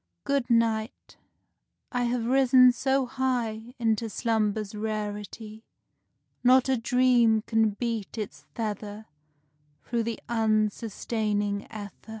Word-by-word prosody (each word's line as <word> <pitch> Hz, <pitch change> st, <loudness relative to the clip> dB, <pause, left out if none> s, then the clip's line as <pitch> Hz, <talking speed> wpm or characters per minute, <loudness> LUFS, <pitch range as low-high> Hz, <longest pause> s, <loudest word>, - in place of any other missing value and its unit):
Good 280 Hz, -3 st, 0 dB
night; 230 Hz, -1 st, 0 dB, 0.7 s
I 245 Hz, -1 st, 0 dB
have 240 Hz, -1 st, -1 dB
risen 255 Hz, 0 st, +6 dB
so 265 Hz, +1 st, +1 dB
high 245 Hz, -2 st, -2 dB
Into 225 Hz, -1 st, 0 dB
slumber's 215 Hz, -1 st, -1 dB
rarity, 215 Hz, 0 st, -5 dB, 0.8 s
Not 255 Hz, +1 st, +5 dB
a 265 Hz, -, +2 dB
dream 240 Hz, -2 st, +3 dB
can 225 Hz, -1 st, +2 dB
beat 230 Hz, -2 st, -3 dB
its 210 Hz, -2 st, -6 dB
feather 210 Hz, -1 st, -4 dB, 0.8 s
Through 235 Hz, -1 st, -1 dB
the 230 Hz, 0 st, -3 dB
unsustaining 215 Hz, -2 st, -1 dB
ether. 205 Hz, -3 st, -7 dB
225 Hz, 105 wpm, -27 LUFS, 215-245 Hz, 0.8 s, risen